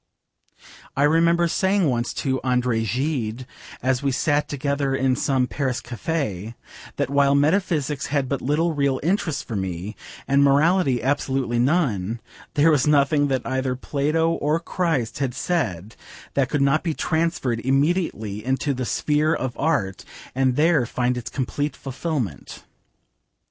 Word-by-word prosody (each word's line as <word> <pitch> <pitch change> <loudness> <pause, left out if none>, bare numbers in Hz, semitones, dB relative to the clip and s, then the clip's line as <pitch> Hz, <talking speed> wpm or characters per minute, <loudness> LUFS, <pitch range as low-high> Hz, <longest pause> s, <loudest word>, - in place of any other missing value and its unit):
I 140 - +3
remember 170 +3 +4
saying 190 +1 +2
once 120 -2 0
to 130 -1 0
Andre 125 -3 +1
Gide, 125 0 -2 0.4
as 130 0 +1
we 140 -1 0
sat 145 +3 +1
together 140 -1 -1
in 130 -1 +2
some 135 -1 +1
Paris 130 +1 -2
cafe, 120 - -3 0.4
that - - -2
while 140 0 +4
meta 150 +7 +4
physics 150 -7 -2
had 140 -2 0
but 140 0 -2
little 160 +5 +1
real 140 -3 +1
interest 175 -2 -1
for 115 - -4
me, 95 +1 -4 0.3
and 140 +1 +4
morality 140 -2 +3
absolutely 135 -3 0
none, 120 - +1 0.4
there 150 +3 +5
was 145 -2 +2
nothing 145 0 +3
that 130 -3 -1
either 130 -1 -1
Plato 150 +5 0
or 155 0 0
Christ 165 -9 -1
had 130 -3 -1
said 110 - -2 0.4
that 135 -2 +1
could 145 0 +1
not 140 +3 +3
be 165 -4 -2
transferred 160 -8 0
immediately 135 - 0
into 130 +3 0
the 130 -1 -3
sphere 150 +5 +1
of 130 -2 -3
Art 140 - -1 0.3
and 130 -1 +1
there 150 -4 +3
find 125 +1 0
its 120 -1 -5
complete 145 +2 -2
fulfilment. 135 - -4
140 Hz, 145 wpm, -23 LUFS, 125-155 Hz, 0.4 s, there